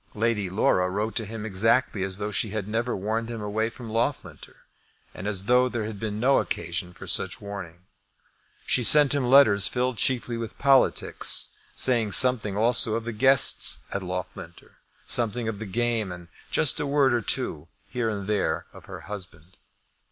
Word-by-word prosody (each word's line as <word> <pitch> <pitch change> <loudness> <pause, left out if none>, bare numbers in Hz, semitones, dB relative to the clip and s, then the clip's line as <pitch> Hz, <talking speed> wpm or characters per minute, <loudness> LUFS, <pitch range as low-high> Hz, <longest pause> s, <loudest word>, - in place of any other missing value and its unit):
Lady 110 -3 -1
Laura 90 -1 +1
wrote 105 +4 -3
to 110 -3 -3
him 110 0 -7
exactly 110 +2 +1
as 95 0 -3
though 105 +1 -4
she 105 +1 -1
had 105 -1 -4
never 115 +3 -2
warned 110 +4 -3
him 115 -1 -6
away 105 +2 -2
from 120 0 -11
Loughlinter, 115 +6 -4 0.6
and 95 - -7
as 100 -3 -2
though 125 +4 +3
there 120 -3 -4
had 105 -2 -7
been 105 -1 -4
no 135 +4 +3
occasion 85 +1 -4
for - - -12
such - - 0
warning. 95 -4 -9 0.8
She 125 - +2
sent 145 +3 +6
him 140 -2 0
letters 110 -8 +6
filled 125 -3 -2
chiefly 120 -1 0
with 115 -1 -7
politics, 135 -1 +2 0.2
saying 115 -5 +1
something 120 -6 +4
also 115 0 +3
of 115 - -3
the 120 - -3
guests 130 +3 +3
at 100 - -3
Loughlinter, 90 -1 -8 0.3
something 115 -1 -2
of 110 -3 -4
the 110 - -6
game, 115 -1 -1
and 85 -1 -10 0.2
just - - +2
a 145 - -2
word 140 -2 +2
or 120 - +1
two 75 -6 -2 0.2
here 120 -3 -2
and 100 -3 -4
there 105 0 -1
of - - -14
her - - -10
husband. 90 -4 -10
110 Hz, 175 wpm, -25 LUFS, 100-120 Hz, 0.8 s, sent